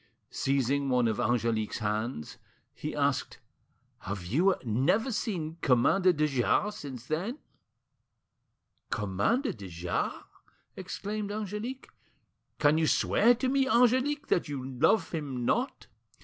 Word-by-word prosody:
Seizing 140 +1 0
one 125 -2 +3
of 110 - -1
Angelique's 115 -2 0
hands, 110 - -3 0.3
he - - -5
asked— - - 0 0.6
"Have 95 -2 -5
you 170 - +3
never 155 - +1
seen 170 -7 -3
Commander 165 +9 +4
de 155 -3 +1
Jars 145 - +1
since 130 -4 -8
then?" 180 - -2 1.5
"Commander 105 - 0
de 100 -4 -9
Jars!" 85 0 -3 0.5
exclaimed 205 +2 -4
Angelique. 215 +5 -5 0.7
"Can 150 +1 +4
you 160 - +2
swear 240 +9 +4
to 260 +2 -1
me, 270 0 +2
Angelique, 260 +5 +3
that 175 - +2
you 135 -3 -4
love 135 - +2
him 140 -7 -3
not?" 250 - 0
155 Hz, 120 wpm, -29 LUFS, -, 1.5 s, Commander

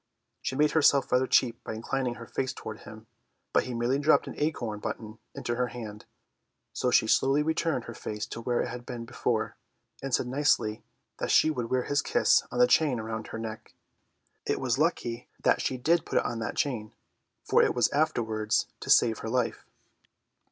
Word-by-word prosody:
She 130 - -3
made 150 +1 +3
herself 140 -3 +4
rather 125 +1 +3
cheap 120 -2 +2
by - - -5
inclining 125 +2 -2
her 115 - -9
face 130 +3 -2
toward 110 0 -8
him, 110 +1 -12 0.5
but - - +3
he 125 - -4
merely 120 +4 +1
dropped 150 +2 +4
an - - -6
acorn 120 -9 -2
button 110 +1 -6 0.2
into 120 - -3
her 125 0 +1
hand, 110 -4 -8 0.7
so 125 - 0
she 120 - +4
slowly 135 +6 +3
returned 160 -4 0
her 120 - -8
face 105 -1 -5
to 115 - -7
where 120 +1 0
it - - -2
had 125 0 -7
been 120 -2 -6
before, 115 -2 -2 0.4
and 135 - -4
said 120 - +2
nicely 125 -5 +1 0.4
that - - -2
she 155 - +5
would 120 -6 -3
wear 130 -1 +1
his 145 0 +1
kiss 245 - +3
on - - -5
the 245 - +7
chain 150 - +3
around 110 0 -5
her - - -6
neck. 110 -1 -7 0.7
It - - -1
was 130 -1 0
lucky 135 -8 -1
that - - +3
she 130 - -1
did 165 +6 +2
put - - -2
it - - +2
on 115 - -2
that 115 - -3
chain, 115 -7 -1 0.5
for - - +4
it - - +2
was 120 - +4
afterwards 115 -8 +1
to - - -8
save 115 -2 +5
her 110 - -5
life. 125 0 -1
125 Hz, 195 wpm, -28 LUFS, 115-140 Hz, 0.7 s, the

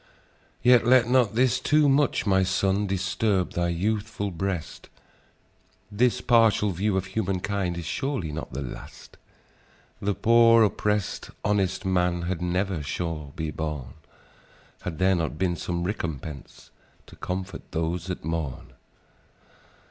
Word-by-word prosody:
"Yet, 125 -1 +6
let 120 0 +5
not 120 -4 +3
this 130 +1 +3
too 150 +3 +3
much, 140 +1 +2
my 95 -2 +3
son, 95 +2 +1
Disturb 95 0 0
thy 85 0 0
youthful 105 +3 -2
breast: 90 -1 -4 1.0
This 120 +4 +2
partial 115 -4 +4
view 95 +3 0
of 95 - -1
human 95 -1 -2
kind 95 -3 -2
Is 85 - -5
surely 95 - -2
not 75 +1 -6
the 70 +3 -4
last! - - -10 0.8
The 100 0 0
poor, 115 0 +6
oppressed, 105 -1 -1 0.2
honest 100 -2 0
man 90 -2 +1
Had 90 0 -3
never, 90 -1 -1
sure, 75 -1 -4
been 80 -1 -3
born, 75 -6 -4 0.9
Had 85 -4 -5
there 95 +1 +3
not 80 -4 -1
been 90 0 0
some 85 0 -3
recompense 80 - -6 0.3
To - - -15
comfort 95 +1 -5
those 85 +1 -2
that 90 -5 -5
mourn! 80 -4 -4
95 Hz, 135 wpm, -26 LUFS, 85-105 Hz, 1.0 s, Yet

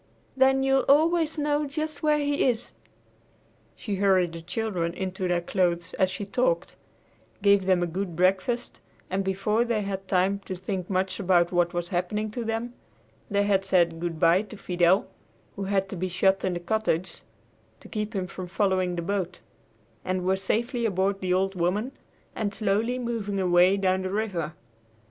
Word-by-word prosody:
Then 265 0 +4
you'll 270 0 +3
always 320 +2 +3
know 295 0 0
just 310 +1 -4
where 300 -1 +3
he 290 -1 0
is." 240 -1 -1 1.0
She 205 -4 -4
hurried 185 -3 +3
the 165 - -7
children 175 -2 -2
into 185 0 -3
their 175 -1 +1
clothes 175 -1 0
as 190 -1 +2
she 200 +2 -5
talked, - - 0 0.7
gave 200 -2 +4
them 185 -2 +3
a - - +2
good 175 +1 -4
breakfast, 190 +7 0 0.3
and 195 +1 0
before 195 +4 +1
they 230 -3 -1
had 195 -1 -4
time 190 +2 +2
to 185 - -4
think 185 0 -4
much 190 0 -1
about 175 -3 +3
what 175 -1 +1
was 175 0 -2
happening 205 +4 -2
to 240 +2 -4
them, 225 +2 -3 0.6
they 200 0 +2
had 200 -1 +2
said 175 -4 +2
good 170 -2 -3
bye 170 +3 +5
to 215 0 -10
Fidel, 180 +1 +2 0.5
who 195 - -4
had 195 0 0
to - - -5
be 185 +1 -2
shut 190 +2 +2
in 185 -1 0
the - - -2
cottage 185 -2 -1 0.6
to - - -13
keep 215 +1 -4
him 190 -2 -1
from 180 +1 -7
following 185 -1 0
the 170 - -3
boat, 190 -1 -3 0.6
and 185 -1 -2
were 190 +1 +3
safely 235 +5 -1
aboard 195 -2 0
the 185 -1 -1
"Old 190 +1 +1
Woman" 195 +8 -1 0.4
and 205 -2 -2
slowly 220 +4 0
moving 225 -5 -3
away 180 +1 +4
down 190 -1 +1
the 185 - -3
river. 185 -7 -2
195 Hz, 175 wpm, -26 LUFS, 180-220 Hz, 1.0 s, bye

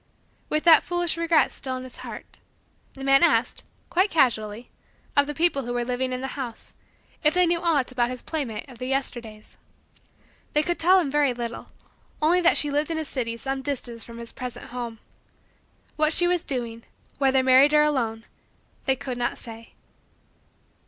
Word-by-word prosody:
With 305 - 0
that 330 -2 +8
foolish 350 -2 0
regret 335 -1 +2
still 260 -2 -4
in 255 - -7
his 255 -1 -11
heart, - - -10 0.5
the 270 - -9
man 275 0 +5
asked, 340 - +2 0.3
quite 375 +4 +3
casually, 225 - 0 0.4
of 285 0 +4
the 295 - -4
people 320 -5 +2
who 245 - -3
were 240 0 -1
living 255 +1 -2
in 255 0 -3
the 265 - -5
house 235 -3 -8 0.5
if 300 +2 +4
they 360 0 +5
knew 340 0 +1
aught 300 -7 +1
about 245 -1 0
his 255 -1 -6
playmate 265 -9 -4
of 250 -4 -14
the 255 - -4
Yesterdays. 240 -5 -3 1.0
They 300 - +3
could 345 +2 -2
tell 370 +3 +5
him 300 -7 -1
very 285 -3 +2
little; 235 -1 -5 0.5
only 335 +4 +3
that 345 - +4
she 295 - +1
lived 295 +2 0
in 325 - -2
a 315 - -3
city 235 -5 -3
some 270 +3 -3
distance 245 -4 -4
from 235 0 -11
his 235 0 -7
present 250 -2 -7
home. 240 -2 -6 1.0
What 310 +1 +3
she 350 +2 +5
was 355 -1 +1
doing; 235 -4 -3 0.4
whether 265 -1 +3
married 265 +3 +6
or 300 - +6
alone; 230 -7 -1 0.6
they 265 - +2
could 255 -1 -6
not 240 - -1
say. 230 -1 -11
270 Hz, 180 wpm, -25 LUFS, 240-310 Hz, 1.0 s, that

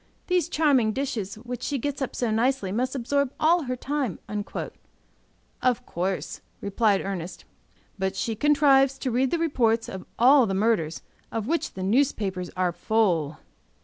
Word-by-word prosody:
These 360 -3 +1
charming 280 -10 +3
dishes, 225 -7 -3
which 245 +2 -7
she 285 - -1
gets 280 +2 -3
up 270 - -3
so 240 -3 0
nicely, 225 -3 +1
must 255 +6 -1
absorb 275 +1 0
all 330 0 +3
her 255 0 -2
time." 270 - -2 1.4
"Of 250 -1 +1
course," 185 +2 -3 0.2
replied 200 0 +1
Ernest. 185 -3 -5 0.5
"But 190 0 -1
she 225 +3 -2
contrives 275 0 +4
to 265 -1 -2
read 255 +3 +2
the 340 - 0
reports 235 -9 +1
of 190 - -8
all 255 +1 +6
the 195 - -1
murders, 195 -6 0 0.3
of 225 -2 -2
which 330 +6 -1
the 185 - -4
newspapers 200 -5 0
are 180 -1 +2
full." 175 -7 +1
240 Hz, 150 wpm, -26 LUFS, 195-275 Hz, 1.4 s, all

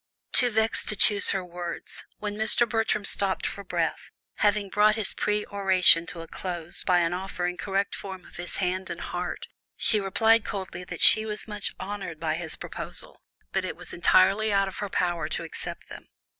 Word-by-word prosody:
Too 245 - +5
vexed 220 0 0
to 215 - 0
choose 205 0 +3
her 190 -2 0
words, 175 -1 -7
when 210 -1 -4
Mr. 220 +2 +2
Bertram 220 -2 -1
stopped 195 -1 -1
for 200 - -4
breath, 170 -3 -3 0.3
having 205 -1 +1
brought 210 +2 +3
his 220 -3 0
peroration 195 -5 +3
to 170 - -7
a 165 - -9
close 175 -2 -5
by 180 -2 +3
an 170 0 0
offer 180 -1 -4
in 180 0 -2
correct 195 +2 -2
form 190 -2 -8
of - - -14
his 175 0 -6
hand 185 0 -2
and - - -6
heart, - - -5 0.3
she 215 - +5
replied 220 +3 +3
coldly 190 -3 -6
that - - -8
she 215 - +10
was 215 0 -5
much 210 -2 -3
honoured 190 -5 -6
by 160 -1 -1
his 160 -1 -4
proposals, - - -8 0.3
but - - -1
it - - -4
was - - -7
entirely 195 +5 +3
out 195 -1 +2
of 190 - -7
her 205 - -4
power 175 -2 -1
to - - -3
accept - - -5
them. - - -11
195 Hz, 190 wpm, -26 LUFS, 180-210 Hz, 0.3 s, she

